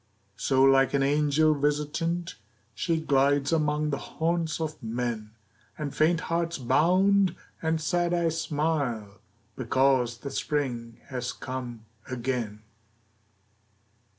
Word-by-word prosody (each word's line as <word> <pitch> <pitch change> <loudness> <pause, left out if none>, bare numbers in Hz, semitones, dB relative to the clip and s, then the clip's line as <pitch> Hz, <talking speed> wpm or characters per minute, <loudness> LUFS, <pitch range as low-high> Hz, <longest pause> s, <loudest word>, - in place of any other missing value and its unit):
So, 130 -1 +2
like 135 0 +5
an 135 - +2
angel 150 +2 +3
visitant, 150 +4 -1 0.4
She 165 +7 0
glides 140 0 +2
among 150 -1 +1
the 140 - -2
haunts 165 -1 -1
of 155 -1 -4
men, 115 -2 -3 0.4
And 150 -3 -4
faint 165 +2 +3
hearts 170 -1 -1
bound, 185 +7 +3 0.3
and 160 0 0
sad 175 +2 0
eyes 165 -2 +1
smile, 140 - -2 0.4
Because 130 -3 +2
the 140 +3 -7
Spring 120 -6 -2
has 125 -2 -3
come 125 -3 -6 0.2
again. 120 -4 -3
145 Hz, 110 wpm, -27 LUFS, 125-160 Hz, 0.4 s, like